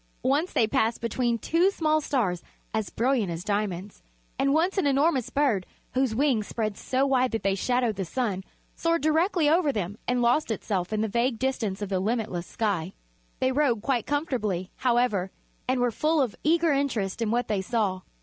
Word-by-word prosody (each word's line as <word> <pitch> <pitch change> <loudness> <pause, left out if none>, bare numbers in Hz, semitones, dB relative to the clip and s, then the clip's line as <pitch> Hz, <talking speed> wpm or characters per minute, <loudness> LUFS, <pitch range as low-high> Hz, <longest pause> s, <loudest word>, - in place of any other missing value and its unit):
Once 290 +7 +1
they 225 - +3
passed 225 +1 +1
between 235 +1 0
two 335 - +2
small 310 -5 +1
stars 210 - 0 0.3
as 220 -2 -1
brilliant 235 -5 +1
as 165 +1 -5
diamonds, 205 -2 -3 0.4
and 275 - +3
once 345 +6 +2
an 345 - +2
enormous 275 -2 +2
bird, 270 -10 +1 0.3
whose 255 -3 +1
wings 250 -5 +1
spread 215 -3 -2
so 260 +6 0
wide 260 -2 +2
that 225 -2 -3
they 195 0 +2
shadowed 245 +2 0
the 195 - -1
sun, 195 -1 -2 0.3
soared 335 -1 0
directly 320 +1 +2
over 315 -1 +3
them 205 -3 -4
and 245 0 +1
lost 245 +5 +2
itself 195 -4 -2
in 215 -1 0
the 220 - +1
vague 235 +3 0
distance 220 -6 -2
of 200 - -4
the 190 -2 0
limitless 205 -4 -2
sky. 195 -5 -2 0.5
They 260 - +2
rode 255 -6 +1
quite 250 -4 0
comfortably, 225 - -1
however, 240 -7 +1 0.4
and 255 0 +1
were 245 -1 +2
full 310 +7 +1
of 255 -6 0
eager 330 +1 +3
interest 240 -8 -1
in 225 - +1
what 240 +1 0
they 210 -3 0
saw. 195 -3 -1
240 Hz, 185 wpm, -26 LUFS, 205-275 Hz, 0.5 s, they